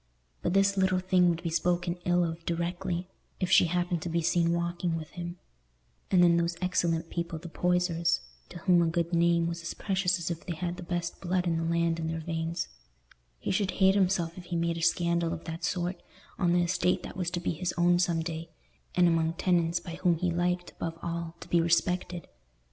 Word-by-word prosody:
But 175 - 0
this 195 0 +3
little 190 -1 +3
thing 185 -1 +3
would 170 0 -1
be 165 - -2
spoken 175 +1 0
ill 175 0 +3
of 165 0 -3
directly, 175 +1 -2 0.3
if 185 -1 -1
she 180 - +7
happened 175 0 0
to 175 - -4
be 170 0 0
seen 170 +1 +2
walking 170 0 -1
with 155 -1 -8
him; 175 0 -6 0.7
and 180 -2 +5
then 170 -1 +5
those 170 0 0
excellent 170 -3 0
people, 170 -1 -3
the 170 +2 -9
Poysers, 175 -1 +1 0.3
to 175 - -9
whom 180 -2 +4
a 170 - +3
good 170 +1 -1
name 170 0 +3
was 170 0 -3
as 170 - -5
precious 185 -2 +1
as 170 0 -3
if 170 - -5
they 175 - -4
had 175 +2 -3
the - - -7
best 175 -1 -3
blood 180 0 0
in 170 -1 +1
the 165 - -1
land 165 0 +1
in 160 - -2
their 165 0 -2
veins—he - - -6
should 195 0 +1
hate 190 -1 +5
himself 185 -4 +1
if 175 - -11
he 175 - -4
made 170 0 0
a - - -5
scandal 170 0 +2
of 165 - -6
that 165 0 -6
sort, 175 0 -1 0.4
on 175 -2 +3
the 175 0 +3
estate 180 +1 +1
that - - -7
was 180 -2 -1
to 175 - -2
be 175 - -1
his 175 +2 -2
own 175 0 +4
some 170 -2 +1
day, 165 0 -5 0.5
and 180 -1 +5
among 165 -1 +2
tenants 170 -1 +1
by 170 - -8
whom 175 -3 +3
he 180 +1 0
liked, 175 +1 -1
above 165 -1 -5
all, 170 -1 -4
to - - -10
be 170 - +3
respected. 175 +1 0
170 Hz, 215 wpm, -29 LUFS, 165-180 Hz, 0.7 s, she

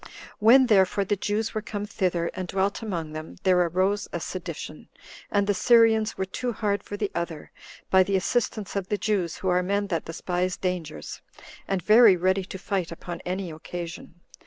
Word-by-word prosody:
When, 245 +5 +7
therefore, 200 -3 +3
the 205 - +1
Jews 210 +3 -2
were 215 - -2
come 205 -1 -5
thither, 180 -5 -1
and 185 -1 -5
dwelt 195 +4 -1
among 170 -8 -4
them, 155 +1 -7
there 185 -2 +4
arose 185 +4 +1
a - - -3
sedition, - - -7 0.4
and 200 -1 +2
the 205 - +2
Syrians 225 0 +4
were 190 - -1
too 245 +6 -3
hard 205 -2 -1
for 205 - -7
the 205 -1 -2
other, 170 -3 -5 0.4
by 190 - +7
the 195 +1 +1
assistance 205 +1 -1
of 195 -2 -2
the 210 - -1
Jews, 195 -4 -1
who 190 - -2
are 180 0 +3
men 200 +3 0
that 170 -4 -2
despise 180 +2 -2
dangers, 175 - -4 0.5
and 190 -2 -1
very 215 -3 +7
ready 185 +2 +1
to 190 - -7
fight 185 -2 -2
upon 170 +1 -7
any 185 -1 -3
occasion. 170 +1 -7
190 Hz, 185 wpm, -26 LUFS, 180-205 Hz, 0.5 s, When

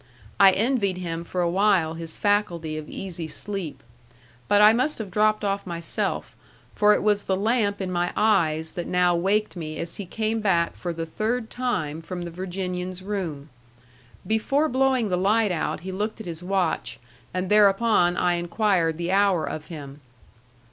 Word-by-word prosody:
I 195 -1 +9
envied 210 -4 +1
him 170 -2 -4
for 180 +1 -3
a 175 - +2
while 185 -3 +2
his 165 -1 -6
faculty 175 -7 0
of 155 -1 -6
easy 175 -4 -5
sleep. 170 -5 -5 0.6
But 205 - +4
I 210 +1 +8
must 260 +6 +1
have 210 -4 -6
dropped 215 +2 +2
off 200 -1 -1
myself; 170 -1 -3 0.4
for 210 0 +5
it - - -2
was 205 -1 +2
the 190 - +1
lamp 205 0 +1
in 190 -2 -3
my 175 0 0
eyes 160 -7 +2
that 175 -2 -5
now 180 -1 +3
waked 200 +5 0
me 155 -3 -6
as 170 0 -4
he 200 - -6
came 220 +3 -1
back 180 -5 +1
for 175 - -4
the 165 0 -4
third 220 +7 -2
time 165 -12 -2
from 175 +1 -6
the 170 - -6
Virginian's 180 0 -4
room. 170 -8 -4 0.8
Before 270 +8 +1
blowing 260 -4 +1
the 180 - +1
light 210 +3 +2
out 165 -2 -2
he 190 +2 -6
looked 210 +4 -3
at 220 - -7
his 170 -1 -6
watch, 180 -3 -1 0.3
and 185 0 -2
thereupon 205 -3 +4
I 175 -1 +2
inquired 175 -2 +1
the 170 +1 -2
hour 195 -3 +3
of 155 - -6
him. 145 -4 -9
185 Hz, 175 wpm, -25 LUFS, 170-210 Hz, 0.8 s, I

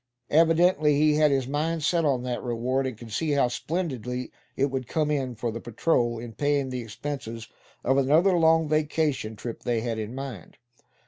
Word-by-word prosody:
Evidently 160 -1 +4
he 150 +1 +4
had 150 0 +4
his 135 -3 0
mind 155 +3 -1
set 170 +2 +2
on 130 -4 +1
that 125 -1 -3
reward; 125 +2 -1
and 125 -4 -6
could 115 -1 -11
see 150 +6 0
how 140 -3 +3
splendidly 125 - -3 0.3
it 135 0 +1
would 130 -3 -3
come 150 +2 0
in 130 -4 -1
for 115 +1 -3
the 115 - -5
patrol, 120 0 0
in 115 0 -8
paying 145 +2 0
the 125 -1 -3
expenses 115 0 -6 0.4
of 135 +2 +3
another 155 +8 +4
long 160 -1 +4
vacation 150 -6 0
trip 115 +2 -7
they 120 -2 0
had 115 -1 -3
in 110 +3 -5
mind. 135 -10 -7
135 Hz, 185 wpm, -26 LUFS, 120-155 Hz, 0.4 s, Evidently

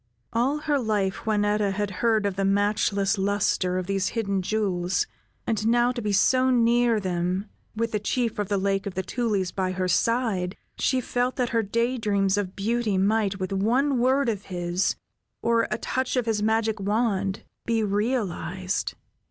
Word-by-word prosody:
All 250 +6 +1
her 295 -2 +1
life, 210 -5 -1
Juanetta 210 -1 +1
had 205 0 -2
heard 220 -3 +3
of 200 -2 -1
the 195 - -1
matchless 200 0 +1
luster 190 -2 +1
of 185 - -2
these 195 0 0
hidden 200 -4 -1
jewels, 190 - 0 0.4
and 220 -1 0
now 240 +1 +3
to 245 -1 -4
be 210 -2 -1
so 255 +6 +3
near 240 -2 +3
them, 180 0 -1 0.3
with 230 +1 -1
the 210 - 0
Chief 230 +2 -1
of 205 - -2
the 200 - +1
Lake 195 0 0
of 195 - -5
the 190 - -1
Tulies 205 -3 -1
by 185 -1 -1
her 185 0 -1
side, 200 -2 +1 0.2
she 260 -1 +2
felt 245 +1 -1
that 250 -3 0
her 230 -2 +2
day 235 +4 0
dreams 200 -3 +1
of 200 -2 -3
beauty 220 0 0
might, 200 0 +1
with 185 +1 -3
one 250 +7 +2
word 260 +2 +3
of 210 -4 -2
his, 175 0 -1 0.5
or 230 0 +2
a - - -1
touch 260 0 -2
of 250 -2 +1
his 220 -2 0
magic 220 0 +1
wand, 200 -1 0 0.2
be 225 -1 +1
realized. 200 -3 -1
210 Hz, 175 wpm, -25 LUFS, 195-235 Hz, 0.5 s, heard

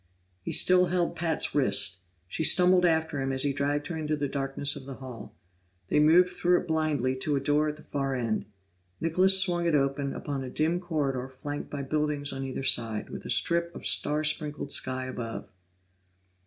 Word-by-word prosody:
He - - -5
still 180 0 +4
held 175 -1 -1
Pat's 165 -2 +1
wrist; 100 -8 +3 0.3
she 160 - -3
stumbled 180 +2 +5
after 160 -3 0
him 135 0 -2
as 130 0 +2
he 140 -1 0
dragged 145 +1 -2
her 175 - -5
into 155 -1 -2
the 145 -1 -2
darkness 135 0 -1
of 135 -2 -10
the 135 - -7
hall. 125 -5 -10 0.5
They - - +2
moved 170 +4 +5
through 180 0 +1
it - - -11
blindly 155 -5 0
to 145 +2 -1
a - - +1
door 145 +2 +1
at 150 - -5
the 155 - -16
far 135 -1 -3
end; 115 -5 -2 0.5
Nicholas 185 +4 +4
swung 175 -3 0
it 165 - +2
open 140 0 -1
upon 140 -2 -5
a 130 - -6
dim 160 +6 0
corridor 140 -7 -3
flanked 145 +3 -7
by 140 -1 -5
buildings 150 0 0
on 135 - -5
either 135 0 -5
side, 115 -4 +1
with - - -8
a - - -7
strip 170 0 +1
of - - -9
star 150 +1 +2
sprinkled 150 -2 -2
sky 130 -1 +1
above. 120 -3 -7
145 Hz, 195 wpm, -27 LUFS, 135-160 Hz, 0.5 s, stumbled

